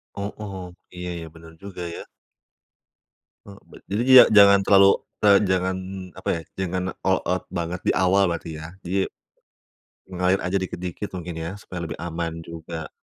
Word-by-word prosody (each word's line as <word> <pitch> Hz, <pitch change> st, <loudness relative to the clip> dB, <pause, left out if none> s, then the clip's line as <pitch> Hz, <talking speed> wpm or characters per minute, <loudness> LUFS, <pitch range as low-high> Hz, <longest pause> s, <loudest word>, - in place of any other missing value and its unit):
Oh 100 Hz, +1 st, -4 dB
oh. 100 Hz, -2 st, -6 dB, 0.4 s
Iya 90 Hz, 0 st, -5 dB
iya, 85 Hz, -, -7 dB
bener 80 Hz, 0 st, -14 dB
juga, 100 Hz, -3 st, -8 dB
ya. -, -, -7 dB, 1.5 s
E -, -, -10 dB, 0.2 s
bet -, -, -14 dB
jadi 105 Hz, +4 st, 0 dB
dia 130 Hz, -1 st, +11 dB
jangan 100 Hz, -1 st, +8 dB
terlalu, 100 Hz, 0 st, +6 dB, 0.4 s
eee, 100 Hz, -1 st, +8 dB
jangan, 95 Hz, 0 st, +1 dB, 0.4 s
apa -, -, -5 dB
ya, -, -, -6 dB, 0.2 s
jangan 95 Hz, -1 st, -1 dB, 0.2 s
all 95 Hz, -1 st, +2 dB
out 90 Hz, 0 st, -1 dB
banget 85 Hz, 0 st, -3 dB
di -, -, -1 dB
awal, 95 Hz, 0 st, +3 dB
berarti, 85 Hz, -1 st, -4 dB
ya? 80 Hz, -, -7 dB, 0.2 s
Jadi, 95 Hz, +2 st, 0 dB, 1.0 s
mengalir 90 Hz, +1 st, +1 dB
aja 90 Hz, +2 st, -1 dB
dikit-dikit 90 Hz, +1 st, -5 dB
mungkin, 85 Hz, 0 st, -7 dB
ya? 80 Hz, 0 st, -4 dB
Supaya 90 Hz, -3 st, -6 dB
lebih 80 Hz, -, -6 dB
aman 85 Hz, -1 st, -4 dB
juga. 80 Hz, -1 st, -7 dB
90 Hz, 160 wpm, -24 LUFS, 85-95 Hz, 1.5 s, dia